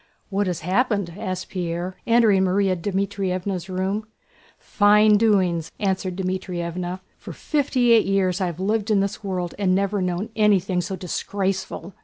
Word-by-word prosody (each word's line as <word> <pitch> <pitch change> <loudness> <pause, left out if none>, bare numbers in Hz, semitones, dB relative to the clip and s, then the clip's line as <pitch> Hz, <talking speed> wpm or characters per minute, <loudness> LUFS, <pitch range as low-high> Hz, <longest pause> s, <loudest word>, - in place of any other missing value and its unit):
"What 200 0 0
has 175 -3 -2
happened?" 200 0 0
asked 185 -2 -4
Pierre, 175 0 -3
entering 225 -5 +4
Márya 190 0 +2
Dmítrievna's 190 -1 -2
room. 190 +3 -2 0.5
"Fine 210 0 +4
doings!" 185 -7 +2
answered 190 -2 -1
Dmítrievna. 180 -1 -3 0.2
"For - - -9
fifty 265 -5 +1
eight 230 -3 +5
years 195 -1 +1
have 175 -3 -2
I - - -3
lived 215 +1 0
in 210 -2 +3
this 200 +2 -3
world 185 -3 -3
and 185 -2 +2
never 200 +1 0
known 180 +3 -2
anything 195 -4 +2
so 190 +2 -4
disgraceful!" 190 0 -3
190 Hz, 145 wpm, -23 LUFS, 180-205 Hz, 0.5 s, eight